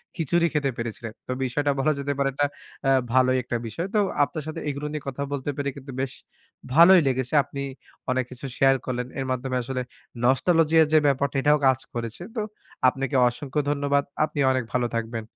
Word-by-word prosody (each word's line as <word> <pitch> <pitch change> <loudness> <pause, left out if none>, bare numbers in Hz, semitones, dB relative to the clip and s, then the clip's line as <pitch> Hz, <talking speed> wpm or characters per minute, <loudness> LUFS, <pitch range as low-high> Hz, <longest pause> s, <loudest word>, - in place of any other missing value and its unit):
খিচুড়ি 170 0 +2
খেতে 145 -2 +1
পেরেছিলেন। 115 -1 -5
তো - - -3
বিষয়টা 145 +3 0
বলা 155 +3 +3
যেতে 140 0 -1
পারে, 135 0 +2
এটা 145 +2 +1 0.4
আ - - +5 0.2
ভালোই 130 0 +4
একটা 120 -1 -2
বিষয়। 165 - -4
তো - - +5 0.2
আপনার 155 +1 -3
সাথে 155 - -5
এগুলো 145 +1 -4
নিয়ে 150 -2 -5
কথা 135 +1 -3
বলতে 140 0 -3
পেরে 140 0 -1
কিন্তু 135 0 -9
বেশ 135 - -2 0.6
ভালোই 175 +2 +8
লেগেছে। 130 0 -1
আপনি 140 0 -7 0.5
অনেক 130 -1 0
কিছু 125 +2 -8
শেয়ার 135 0 +5
করলেন। 125 -1 -2
এর 135 - -2
মাধ্যমে 130 0 -2
আসলে 130 +1 -3 0.4
নস্টালজিয়ার 160 +4 +4
যে 155 - +7
ব্যাপারটা, 140 0 +1
এটাও 150 +1 +4
কাজ 130 -1 +3
করেছে। 115 +7 -5
তো 220 - -1 0.5
আপনাকে 135 +2 0
অসংখ্য 135 +4 -2
ধন্যবাদ। 140 0 +1 0.2
আপনি 150 -1 -6
অনেক 130 -1 0
ভালো 125 -1 +1
থাকবেন। 115 0 -2
135 Hz, 185 wpm, -25 LUFS, 130-150 Hz, 0.6 s, ভালোই